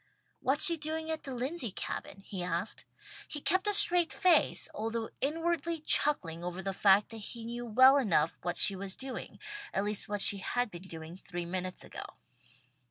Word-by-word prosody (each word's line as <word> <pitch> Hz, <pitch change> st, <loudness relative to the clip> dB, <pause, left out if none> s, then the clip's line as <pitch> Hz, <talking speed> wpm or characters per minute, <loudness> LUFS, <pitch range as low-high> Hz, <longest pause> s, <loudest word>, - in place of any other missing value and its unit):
"What's 275 Hz, +4 st, +2 dB
she 335 Hz, -1 st, +3 dB
doing 315 Hz, +1 st, -3 dB
at 315 Hz, -1 st, -4 dB
the 265 Hz, -2 st, -5 dB
Lindsey 255 Hz, +1 st, -2 dB
Cabin?" 195 Hz, +1 st, -6 dB
he 190 Hz, -3 st, -5 dB
asked. 175 Hz, +3 st, -3 dB, 0.4 s
He 295 Hz, -, -5 dB
kept 370 Hz, +7 st, +1 dB
a 415 Hz, -, +2 dB
straight 350 Hz, -3 st, +5 dB
face, 360 Hz, -6 st, +4 dB
although 225 Hz, +1 st, -3 dB
inwardly 330 Hz, +2 st, -1 dB
chuckling 180 Hz, -, +2 dB
over 180 Hz, +2 st, -5 dB
the 195 Hz, -, -2 dB
fact 195 Hz, +1 st, +4 dB
that 225 Hz, -, -8 dB
he 225 Hz, +2 st, -7 dB
knew 240 Hz, +1 st, -5 dB
well 260 Hz, +5 st, +7 dB
enough 165 Hz, -, +2 dB
what 175 Hz, 0 st, -3 dB
she 200 Hz, -, +3 dB
was 190 Hz, 0 st, -4 dB
doing, 265 Hz, 0 st, -6 dB, 0.3 s
at 195 Hz, -, 0 dB
least 205 Hz, 0 st, 0 dB
what 205 Hz, -1 st, -2 dB
she 200 Hz, -, +3 dB
had 245 Hz, +4 st, -1 dB
been 175 Hz, +2 st, -10 dB
doing 165 Hz, 0 st, -8 dB
three 175 Hz, -2 st, -6 dB
minutes 185 Hz, +1 st, -4 dB
ago. -, -, -9 dB
225 Hz, 180 wpm, -31 LUFS, 190-300 Hz, 0.4 s, well